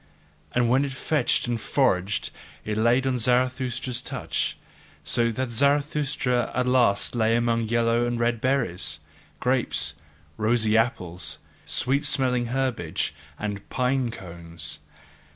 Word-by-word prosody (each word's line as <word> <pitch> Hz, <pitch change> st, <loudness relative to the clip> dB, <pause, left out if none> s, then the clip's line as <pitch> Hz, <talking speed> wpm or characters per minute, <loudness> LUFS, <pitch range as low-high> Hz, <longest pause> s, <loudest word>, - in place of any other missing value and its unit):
And 125 Hz, -1 st, +3 dB
what 130 Hz, +4 st, +3 dB
it 140 Hz, -2 st, -3 dB
fetched 135 Hz, 0 st, +1 dB
and 120 Hz, -2 st, -1 dB
foraged, 100 Hz, -9 st, +1 dB, 0.3 s
it 105 Hz, -, -2 dB
laid 120 Hz, +4 st, +3 dB
on 130 Hz, -2 st, +1 dB
Zarathustra's 125 Hz, +1 st, 0 dB
couch: -, -, -2 dB, 0.5 s
so 115 Hz, 0 st, +2 dB
that 130 Hz, +2 st, -3 dB
Zarathustra 140 Hz, -1 st, +1 dB
at 125 Hz, -, +1 dB
last 125 Hz, -6 st, +2 dB
lay 115 Hz, -1 st, +2 dB
among 115 Hz, -1 st, +1 dB
yellow 115 Hz, +1 st, +2 dB
and 120 Hz, -1 st, -2 dB
red 120 Hz, -1 st, +1 dB
berries, 90 Hz, -, 0 dB, 0.4 s
grapes, 125 Hz, -1 st, 0 dB, 0.4 s
rosy 110 Hz, 0 st, +2 dB
apples, 90 Hz, -7 st, 0 dB, 0.3 s
sweet 140 Hz, +3 st, +2 dB
smelling 130 Hz, -4 st, +1 dB
herbage, 125 Hz, -9 st, -1 dB, 0.2 s
and 105 Hz, -1 st, -5 dB
pine 130 Hz, -1 st, +1 dB
cones. 85 Hz, -6 st, -7 dB
120 Hz, 120 wpm, -25 LUFS, 110-130 Hz, 0.5 s, And